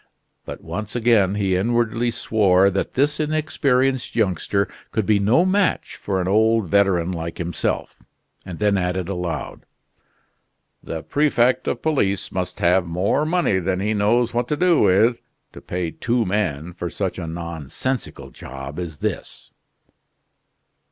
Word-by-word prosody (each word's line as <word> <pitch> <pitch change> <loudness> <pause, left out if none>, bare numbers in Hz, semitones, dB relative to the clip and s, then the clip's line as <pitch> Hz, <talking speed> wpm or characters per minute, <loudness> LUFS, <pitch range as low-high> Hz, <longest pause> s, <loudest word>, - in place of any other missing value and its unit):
But - - -8
once 105 +1 -5
again 110 -5 +3
he 95 -3 +1
inwardly 120 +3 +1
swore 100 -5 +3
that 95 - -2
this 145 +3 +1
inexperienced 135 -4 0
youngster 100 -1 +1 0.2
could 110 - -1
be 105 0 +3
no 115 - +3
match 190 -2 +1
for 95 -2 -2
an 90 - -1
old 110 +1 +3
veteran 95 -2 +2
like 85 -1 -5
himself, 85 -1 -3 0.4
and 90 -3 -8
then 105 -2 +2
added 90 0 -2
aloud: 90 -5 -4 1.2
"The 80 -1 -6
prefect 130 -4 +2
of - - -2
police 100 -11 0
must 90 -1 -3
have 90 +1 +3
more 95 - 0
money 170 - +1
than 95 +1 -1
he 105 +3 0
knows 115 +4 +2
what 120 0 0
to 150 - -1
do 180 -1 +3
with, 105 +5 +3 0.3
to - - -11
pay 85 -2 -3
two 120 +4 0
men 90 -5 -2
for 85 0 -5
such 95 0 -3
a 85 - -5
nonsensical 80 - -4
job 70 +5 -8
as 85 -4 -5
this." - - -5
100 Hz, 145 wpm, -22 LUFS, 90-120 Hz, 1.2 s, again